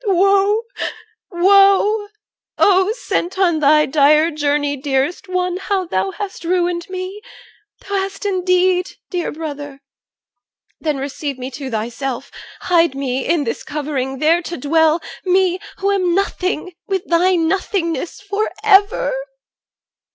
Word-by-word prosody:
Woe! 395 Hz, +2 st, +3 dB, 0.7 s
woe! 395 Hz, +3 st, +4 dB, 0.5 s
Oh! 380 Hz, 0 st, +4 dB
sent 380 Hz, -7 st, -3 dB
on 350 Hz, -4 st, +2 dB
thy 300 Hz, +1 st, +5 dB
dire 300 Hz, +3 st, +4 dB
journey, 290 Hz, -1 st, 0 dB
dearest 275 Hz, +6 st, -2 dB
one, 365 Hz, -1 st, -1 dB
How 380 Hz, 0 st, -1 dB
thou 190 Hz, -, -1 dB
hast 390 Hz, -, -6 dB
ruined 350 Hz, 0 st, 0 dB
me! 370 Hz, +2 st, -6 dB, 0.6 s
Thou 400 Hz, -, -8 dB
hast 390 Hz, +1 st, -4 dB
indeed, 365 Hz, -1 st, +1 dB, 0.2 s
Dear 355 Hz, -3 st, -2 dB
brother! 290 Hz, -3 st, -7 dB, 1.0 s
Then 305 Hz, -3 st, -1 dB
receive 280 Hz, 0 st, -4 dB
me 255 Hz, +1 st, -6 dB
to 270 Hz, +1 st, -6 dB
thyself, 240 Hz, +3 st, -4 dB, 0.3 s
Hide 335 Hz, -5 st, +2 dB
me 265 Hz, -1 st, -2 dB
in 330 Hz, -3 st, +2 dB
this 230 Hz, -, -4 dB
thy -, -, -12 dB
covering, 275 Hz, -3 st, -2 dB
there 320 Hz, +5 st, +3 dB
to 345 Hz, 0 st, -6 dB
dwell, 320 Hz, +4 st, +2 dB, 0.2 s
Me 370 Hz, -1 st, +2 dB, 0.2 s
who 395 Hz, +1 st, 0 dB
am 365 Hz, -3 st, +1 dB
nothing, 370 Hz, -2 st, -1 dB
with 385 Hz, -1 st, -2 dB
thy 355 Hz, +2 st, +3 dB
nothingness, 335 Hz, -1 st, -1 dB
For 405 Hz, +2 st, -2 dB
ever! 415 Hz, +3 st, +4 dB
345 Hz, 130 wpm, -18 LUFS, 290-385 Hz, 1.0 s, thy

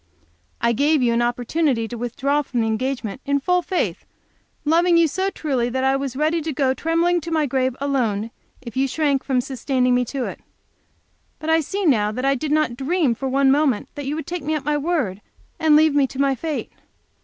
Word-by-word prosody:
I 235 Hz, -, +2 dB
gave 290 Hz, +3 st, +2 dB
you 235 Hz, -1 st, +2 dB
an 235 Hz, -, +1 dB
opportunity 245 Hz, +1 st, 0 dB
to 240 Hz, -, -7 dB
withdraw 265 Hz, +5 st, -1 dB
from 250 Hz, -4 st, -2 dB
our -, -, +1 dB
engagement 235 Hz, +1 st, -2 dB
in 280 Hz, 0 st, +1 dB
full 360 Hz, +5 st, +1 dB
faith, 360 Hz, +1 st, -2 dB, 0.6 s
loving 340 Hz, +3 st, +4 dB
you 335 Hz, -1 st, +5 dB
so 375 Hz, +6 st, -1 dB
truly 265 Hz, -10 st, -1 dB
that 260 Hz, +2 st, -2 dB
I 265 Hz, 0 st, +3 dB
was 270 Hz, -2 st, -3 dB
ready 310 Hz, +4 st, +1 dB
to 315 Hz, +1 st, -3 dB
go 265 Hz, -2 st, +1 dB
trembling 335 Hz, +5 st, +1 dB
to 335 Hz, -, -6 dB
my 315 Hz, -2 st, +1 dB
grave 260 Hz, -2 st, 0 dB
alone 230 Hz, -6 st, -1 dB, 0.3 s
if 235 Hz, -3 st, -9 dB
you 270 Hz, +1 st, +2 dB
shrank 280 Hz, -1 st, 0 dB
from 260 Hz, -3 st, +1 dB
sustaining 255 Hz, 0 st, 0 dB
me 250 Hz, 0 st, +3 dB
to 255 Hz, +1 st, -3 dB
it. -, -, -6 dB, 1.0 s
But 315 Hz, +1 st, -2 dB
I 325 Hz, -, +5 dB
see 390 Hz, +6 st, -3 dB
now 215 Hz, -9 st, +3 dB
that 255 Hz, +4 st, -3 dB
I 275 Hz, -, +4 dB
did 290 Hz, +3 st, -3 dB
not 305 Hz, -6 st, +1 dB
dream 285 Hz, 0 st, +1 dB
for 265 Hz, +3 st, -4 dB
one 270 Hz, +1 st, +3 dB
moment 280 Hz, -6 st, +1 dB
that 285 Hz, -2 st, -6 dB
you 290 Hz, -, -1 dB
would 320 Hz, -, -5 dB
take 355 Hz, 0 st, -4 dB
me 310 Hz, +2 st, -1 dB
at 285 Hz, -3 st, -4 dB
my 300 Hz, 0 st, +1 dB
word 290 Hz, -, -1 dB, 0.4 s
and 315 Hz, -2 st, +4 dB
leave 310 Hz, 0 st, +5 dB
me 285 Hz, -2 st, +3 dB
to 265 Hz, -, -9 dB
my 275 Hz, -1 st, +3 dB
fate. 305 Hz, +3 st, -4 dB
275 Hz, 215 wpm, -22 LUFS, 250-310 Hz, 1.0 s, you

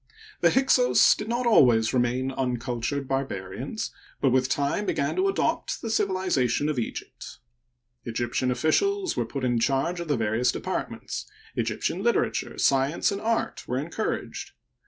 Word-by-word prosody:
— 430 Hz, -1 st, -20 dB
The -, -, +6 dB
Hyksos 270 Hz, -, +5 dB
did 210 Hz, -, -6 dB
not 240 Hz, +1 st, -1 dB
always 120 Hz, -, +5 dB
remain 125 Hz, +1 st, +1 dB
uncultured 125 Hz, +1 st, -2 dB
barbarians, 135 Hz, -, -3 dB, 0.3 s
but 135 Hz, -, +2 dB
with 130 Hz, 0 st, +2 dB
time 145 Hz, +9 st, 0 dB
began 140 Hz, -, 0 dB
to 380 Hz, +1 st, +3 dB
adopt 390 Hz, -, 0 dB
the 225 Hz, -, -2 dB
civilization 185 Hz, -, +1 dB
of 150 Hz, -, -2 dB
Eg^pt. 120 Hz, -, -6 dB, 0.7 s
Egyptian 120 Hz, +2 st, -1 dB
officials 370 Hz, -, +1 dB
were 120 Hz, -, -1 dB
put 135 Hz, +2 st, -5 dB
in 120 Hz, -2 st, +1 dB
charge 140 Hz, +8 st, 0 dB
of 170 Hz, -, -5 dB
the 145 Hz, -3 st, +1 dB
various 115 Hz, +3 st, +1 dB
departments; -, -, -4 dB, 0.3 s
Egyptian -, -, -1 dB
liter -, -, +3 dB
ature, -, -, -5 dB
science, 135 Hz, +7 st, +2 dB
and 200 Hz, -, -3 dB
art 230 Hz, 0 st, -1 dB
were 125 Hz, -, -1 dB
encouraged. 170 Hz, +10 st, -4 dB
135 Hz, 150 wpm, -26 LUFS, 125-200 Hz, 0.7 s, The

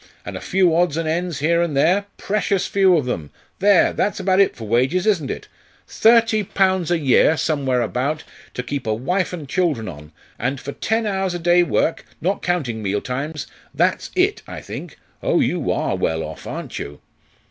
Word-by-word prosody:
and -, -, -6 dB
a -, -, -6 dB
few 185 Hz, -3 st, +2 dB
odds 170 Hz, -3 st, +2 dB
and 165 Hz, -1 st, -1 dB
ends 165 Hz, -2 st, -2 dB
here 170 Hz, +3 st, +3 dB
and 160 Hz, -5 st, -1 dB
there 185 Hz, +8 st, +3 dB
precious 200 Hz, -2 st, 0 dB
few 190 Hz, -3 st, +4 dB
of 145 Hz, -, -1 dB
them! 85 Hz, -12 st, -3 dB, 0.3 s
There! 200 Hz, -1 st, +4 dB
that's 200 Hz, +1 st, -1 dB
about 190 Hz, 0 st, +2 dB
it 200 Hz, -, +4 dB
for 115 Hz, -3 st, -8 dB
wages, 130 Hz, -, +2 dB
isn't 180 Hz, -10 st, +1 dB
it? -, -, -5 dB, 0.4 s
Thirty 225 Hz, -1 st, +4 dB
pounds 190 Hz, -3 st, +1 dB
a 175 Hz, -, +2 dB
year, 150 Hz, +2 st, +4 dB
somewhere 135 Hz, -6 st, 0 dB
about, 135 Hz, +7 st, -2 dB, 0.3 s
to 125 Hz, -, -3 dB
keep 135 Hz, -1 st, -4 dB
a 110 Hz, -, +1 dB
wife 180 Hz, -, -1 dB
and 165 Hz, -6 st, -6 dB
children 150 Hz, -, 0 dB
on 75 Hz, -3 st, -9 dB, 0.3 s
and 135 Hz, +3 st, -1 dB
for 140 Hz, -, -6 dB
ten 225 Hz, +8 st, -1 dB
hours 190 Hz, -3 st, -1 dB
a -, -, -3 dB
day 175 Hz, +1 st, +4 dB
work, 170 Hz, -1 st, 0 dB, 0.2 s
not 195 Hz, +3 st, -1 dB
counting 140 Hz, -11 st, -1 dB
meal 100 Hz, 0 st, -1 dB
times 140 Hz, +5 st, -4 dB, 0.3 s
that's -, -, +1 dB
it, -, -, +2 dB
I -, -, -7 dB
think. -, -, -8 dB, 0.2 s
Oh, -, -, +2 dB
you -, -, 0 dB
are -, -, 0 dB
well 80 Hz, 0 st, -1 dB
off! -, -, -8 dB
aren't -, -, -6 dB
you?" 70 Hz, +1 st, -7 dB
165 Hz, 190 wpm, -21 LUFS, 130-185 Hz, 0.4 s, few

